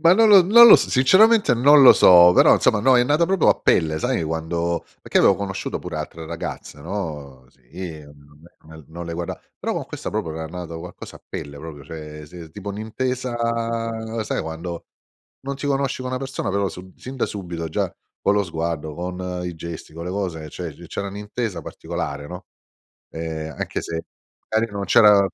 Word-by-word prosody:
Ma 170 +1 +6
non 220 +3 +5
lo 200 -3 +8
non 230 +6 +8
lo - - +10
s - - -2
sinceramente, 200 - +5
non 140 +4 +6
lo 130 - +10
so, 90 -1 +7
però, - - +6
insomma, 110 - +2
no, 130 +3 +5
è 120 - +5
nato 150 +6 +2
proprio 190 -1 +2
a - - +4
pelle. 80 -1 +2
Sai - - -1
quando 85 +2 -2 0.2
perché - - +1
avevo - - +5
conosciuto 95 -1 -4
pure - - -6
altre 80 0 -6
ragazze, 80 -3 -7
no? 70 -8 -6
Sì, 75 +5 -10
mhmm, 75 +1 -19 0.2
no 80 -1 -13
non 85 +2 -8
le 85 - -5
guarda 85 0 -5 0.2
però - - -2
con - - -3
questa - - -6
proprio 80 - -3
era 80 0 -5
nato 85 0 -7
qualcosa - - -10
a - - -22
pelle, 70 0 -7
proprio, 75 -2 -9
cioè 75 0 -9
sì, 85 0 -11
tipo 100 +4 -9
un'intesa 120 +5 -3 0.9
sai 110 - -2
quando 80 +2 -6 0.6
non 140 +1 -5
ti 145 - -5
conosci 135 -2 -1
con 130 - -4
una 130 - -2
persona, 135 -6 -4
però 100 0 0
sub 90 +1 -12
sin 130 +1 -9
da 125 - 0
subito, 85 -5 -6
già - - -2 0.3
con 100 - +2
lo 100 -1 +1
sguardo, 80 -3 -4
con 90 +1 -5
i 90 -1 -5
gesti, 80 -1 -8
con 85 +1 -7
le 90 - -4
cose, 90 -5 -4
cioè 85 -3 -7
c 85 - -13
c'era 100 +4 -5
un'intesa 105 -1 -5
particolare, 70 0 -6
no, 90 +2 -9 0.7
ehm, 80 -1 -5
anche - - -3
se 80 0 -5 0.5
magari 110 0 0
non 100 -1 -4
c'era, 105 +2 +6
90 Hz, 195 wpm, -22 LUFS, 80-110 Hz, 0.9 s, lo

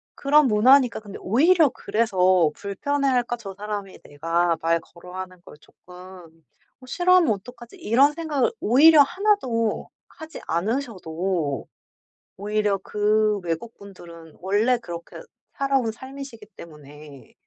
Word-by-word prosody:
그런 290 +1 +3
문화니까 245 +3 +4
근데 205 -2 -10
오히려 310 - +3
그래서 185 -9 +1
불편해할까 245 +4 -1
저 200 -4 -9
사람이 205 -1 -7
'내가 165 +3 -1
말 165 +1 +1
걸어 180 +2 -15
하는 185 -1 -8
걸 - - -13
조금 180 0 -19 0.9
어 - - -13
싫어하면 355 -2 +3
어떡하지.' 240 - -12
이런 275 -1 +3
생각을 310 - -1
오히려 295 +7 +6
하나도 275 - -1 0.2
하지 315 0 -11
않으셔도 180 - -3 0.7
오히려 210 0 -1
그 210 0 +1
외국 170 +7 -4
분들은 170 -5 -14
원래 205 +7 +1
그렇게 170 -7 -9 0.4
살아온 270 -5 0
삶이시기 260 -2 -10
때문에 150 -3 -14
215 Hz, 285 characters per minute, -23 LUFS, 180-270 Hz, 0.9 s, 오히려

